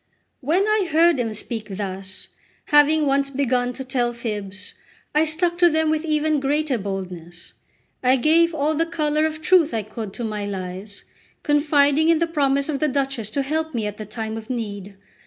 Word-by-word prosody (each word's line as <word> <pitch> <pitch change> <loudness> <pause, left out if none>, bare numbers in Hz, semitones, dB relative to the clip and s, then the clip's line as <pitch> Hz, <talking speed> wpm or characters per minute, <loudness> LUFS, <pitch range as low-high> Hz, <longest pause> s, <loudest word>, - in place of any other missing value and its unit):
When 330 +8 +1
I 430 -3 +2
heard 330 -1 +4
him 230 -2 -1
speak 220 0 -3
thus, 190 -2 -5 0.4
having 295 +1 +5
once 275 0 +1
begun 255 -3 0
to 265 - -6
tell 250 -2 -1
fibs, 205 -4 -6 0.4
I 305 +1 +3
stuck 340 +2 0
to 350 -1 +6
them 315 -1 +1
with 315 +1 -1
even 305 -1 +1
greater 285 -1 0
boldness; 180 -3 -6 0.5
I 255 +1 +4
gave 325 +5 +3
all 300 +1 +1
the 325 +2 0
colour 305 -2 +1
of 310 0 -7
truth 345 -8 +4
I 220 - -1
could 215 0 -7
to 240 - -6
my 210 -2 -3
lies, 190 +1 -6 0.4
confiding 295 +1 +3
in 335 - +5
the 335 - +1
promise 280 -4 +1
of 295 -3 -2
the 305 - +2
Duchess 270 -5 -1
to 275 +5 -1
help 315 +1 -2
me 225 -3 -1
at 210 0 -4
the 215 - -7
time 220 0 -5
of 225 +2 -9
need. 205 -5 -5
275 Hz, 185 wpm, -22 LUFS, 215-310 Hz, 0.5 s, to